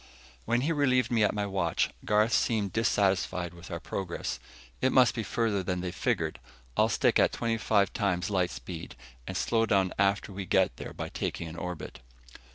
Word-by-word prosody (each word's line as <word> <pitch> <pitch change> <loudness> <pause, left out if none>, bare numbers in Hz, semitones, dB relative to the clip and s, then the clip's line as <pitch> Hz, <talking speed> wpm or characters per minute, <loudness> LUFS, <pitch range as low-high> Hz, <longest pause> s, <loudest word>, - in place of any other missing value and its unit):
When 120 +2 +1
he 150 +5 0
relieved 130 -6 +2
me 115 -2 +2
at 105 - +3
my 105 -1 0
watch, 95 -4 0
Garth 105 +2 +3
seemed 105 -4 +1
dissatisfied 95 -5 +1
with 85 0 -12
our - - -4
progress. 95 -3 -4 0.4
"It 130 - +3
must 125 -3 +5
be 115 - -2
farther 110 -2 0
than 90 -1 -2
they've 90 -1 -4
figured. - - -1 0.4
I'll - - +3
stick - - +3
at - - +4
twenty 115 -1 -1
five 100 -3 +2
times 95 -3 0
light 90 -3 +2
speed, 60 +5 -8 0.3
and - - -3
slow 115 -1 +1
down 95 -3 +2
after 100 +1 +1
we 95 -1 -5
get - - +2
there - - -7
by - - -5
taking 85 - -3
an 80 - -8
orbit." 90 -2 -6
100 Hz, 185 wpm, -29 LUFS, 90-115 Hz, 0.4 s, must